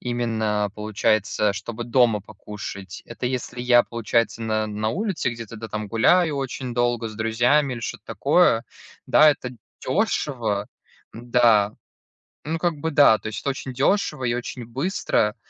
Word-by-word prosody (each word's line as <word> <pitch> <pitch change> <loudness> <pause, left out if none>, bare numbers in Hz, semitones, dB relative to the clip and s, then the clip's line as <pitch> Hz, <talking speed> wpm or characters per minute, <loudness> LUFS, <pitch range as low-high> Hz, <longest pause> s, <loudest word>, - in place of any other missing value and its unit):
именно, 110 -4 -1
получается, 105 -1 0
чтобы 115 +4 -6
дома 120 -3 +3
покушать. 100 -2 -9
Это 120 +1 -5
если 125 -1 -4
я, 120 -1 +5
получается, 115 -1 -1
на 110 -1 0
на 105 +1 -2
улице 190 - -1
где-то, 115 -1 -8
да, 115 +1 -7
там 110 0 -5
гуляю 150 - +3
очень 130 -2 -4
долго 120 -1 0
с 110 - -10
друзьями 120 +5 +2
или 120 - -7
что-то - - -6
такое. - - +3 0.4
Да, 155 0 +6
это 125 -3 -4 0.4
дешево. 130 - -1 0.5
Да, 115 -3 +3 0.7
ну, 160 +2 -2
как 170 -2 0
бы 160 +2 -3
да, 145 -7 +6
то - - -8
есть 105 -2 -5
это 140 - -2
очень 135 -1 -5
дешево 150 +1 +1
и 120 -1 +1
очень 120 0 -5
быстро. 125 - 0
120 Hz, 150 wpm, -23 LUFS, 110-130 Hz, 0.7 s, Да